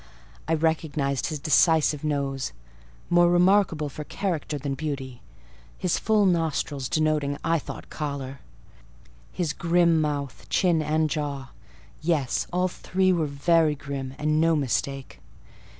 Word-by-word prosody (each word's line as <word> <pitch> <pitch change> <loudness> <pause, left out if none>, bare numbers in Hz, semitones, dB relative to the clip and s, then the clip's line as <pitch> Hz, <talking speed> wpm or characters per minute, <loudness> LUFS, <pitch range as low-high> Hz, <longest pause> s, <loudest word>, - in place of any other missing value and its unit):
I 160 - +2
recognised 155 -4 0
his 155 - -3
decisive 155 0 +3
nose, 140 -3 -2 0.6
more 175 0 +5
remarkable 175 -3 +3
for 150 +2 -7
character 160 -4 -3
than 140 0 -3
beauty; 135 -3 -5 0.6
his 180 - 0
full 215 -2 +3
nostrils, 160 -6 0
denoting, 155 -2 +1
I 165 0 +2
thought, - - -9
choler; 140 -3 -5 0.9
his 165 -5 -2
grim 170 -1 +3
mouth, 145 -3 -3
chin, 175 -4 +2
and 155 +1 +1
jaw—yes, 145 0 -3
all 180 +1 +1
three 185 +1 0
were 165 -3 0
very 155 +2 +2
grim, 135 -2 -6
and 155 +1 +1
no 165 0 +4
mistake. 135 - -2
155 Hz, 120 wpm, -25 LUFS, 140-165 Hz, 0.9 s, more